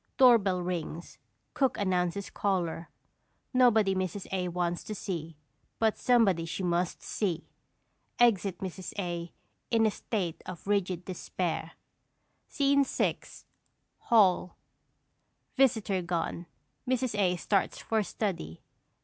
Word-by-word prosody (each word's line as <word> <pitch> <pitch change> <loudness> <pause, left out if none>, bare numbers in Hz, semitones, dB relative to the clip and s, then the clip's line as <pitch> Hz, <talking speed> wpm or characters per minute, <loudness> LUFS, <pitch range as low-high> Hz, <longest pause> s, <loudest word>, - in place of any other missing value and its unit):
Doorbell 205 -8 +5
rings, 170 -2 -5 0.3
cook 265 -3 +1
announces 185 0 0
caller; 175 -4 -1 0.6
nobody 225 -6 +5
Mrs. 185 +1 -3
A. 185 -1 -1
wants 175 0 -2
to 215 - -5
see, 165 -5 -5 0.4
but 220 -1 +2
somebody 215 -9 +3
she 170 +3 -4
MUST 175 0 0
see. 175 -5 -2 0.7
Exit 200 -6 +3
Mrs. 185 -1 -5
A. 175 -3 -3 0.4
in 225 -1 +3
a 215 - +3
state 185 -6 -3
of 185 -3 -8
rigid 185 -3 0
despair._ 175 -3 -3 0.7
SCENE 280 0 +3
VI. - - 0 0.8
HALL. 190 -5 +3 1.0
[_Visitor 220 -8 +2
gone; 170 0 -2 0.4
Mrs. 255 -2 +1
A. 180 -2 +3
starts 195 +3 0
for 220 -1 0
study. 180 - -4
185 Hz, 110 wpm, -29 LUFS, 175-215 Hz, 1.0 s, Doorbell